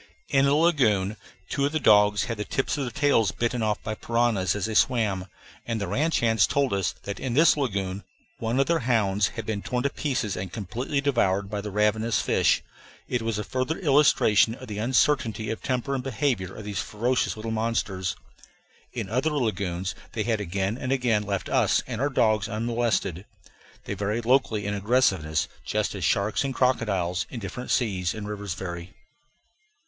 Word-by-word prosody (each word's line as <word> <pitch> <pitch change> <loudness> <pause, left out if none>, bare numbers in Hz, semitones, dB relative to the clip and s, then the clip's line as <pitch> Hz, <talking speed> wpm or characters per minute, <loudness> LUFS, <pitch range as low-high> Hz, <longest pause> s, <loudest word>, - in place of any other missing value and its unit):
In 135 0 +4
a 140 - +3
lagoon 115 - +2 0.3
two 140 - -1
of 145 - -6
the 155 - +1
dogs 105 -4 +5
had 115 - -3
the 105 - -2
tips 135 - -1
of 140 -2 -2
their - - -3
tails 140 -5 +2
bitten 120 0 -1
off 105 -1 -1
by 110 - -3
piranhas 110 -5 +1
as 105 - -1
they 110 - -3
swam, 105 -6 +2 0.4
and 115 -2 -3
the 100 - -3
ranch 150 - +1
hands 110 -3 +3
told 140 -4 +1
us 95 -3 0
that 100 -1 -5
in 125 -3 -3
this 160 +3 +6
lagoon 100 -8 -2 0.4
one 115 +3 -1
of 135 - +4
their 165 +2 +1
hounds 105 -5 +2
had 115 - -4
been 105 -2 -2
torn 125 +3 -2
to 140 - 0
pieces 125 -9 -2
and 90 -1 -5
completely 120 - -3
devoured 100 -8 +1
by 105 -1 -2
the 105 - -5
ravenous 105 +2 +1
fish. - - +2 0.4
It 125 - -1
was 115 -2 -2
a 105 - -2
further 130 +8 -2
illustration 135 - +4
of 130 0 -11
the 105 -1 -5
uncertainty 115 -2 +1
of 110 - -5
temper 130 +1 -1
and 130 -2 -2
behavior 120 - -1
of 110 - -8
these 105 -2 -2
ferocious 120 +4 0
little 110 +1 -5
monsters. 110 -5 -1 0.8
In - - -3
other 130 +9 0
lagoons 100 - -1 0.2
they 110 - -1
had 110 -2 0
again 100 +5 -2
and 130 - -3
again 120 -5 +2
left 100 -2 -3
us - - +2
and 125 -2 -4
our 140 - +2
dogs 110 -5 +2
unmolested. 115 -5 -1 0.6
They - - -3
vary 105 +3 -2
locally 115 -4 +2
in 100 - -1
aggressiveness 100 -7 +1 0.2
just 105 -1 -1
as 100 -3 -5
sharks 100 - +1
and 135 -1 -3
crocodiles 100 -9 +1
in 125 - -6
different 115 +5 -6
seas 95 -7 0
and 105 -1 -6
rivers 105 -4 -4
vary. 85 -1 -7
110 Hz, 185 wpm, -26 LUFS, 100-125 Hz, 0.8 s, this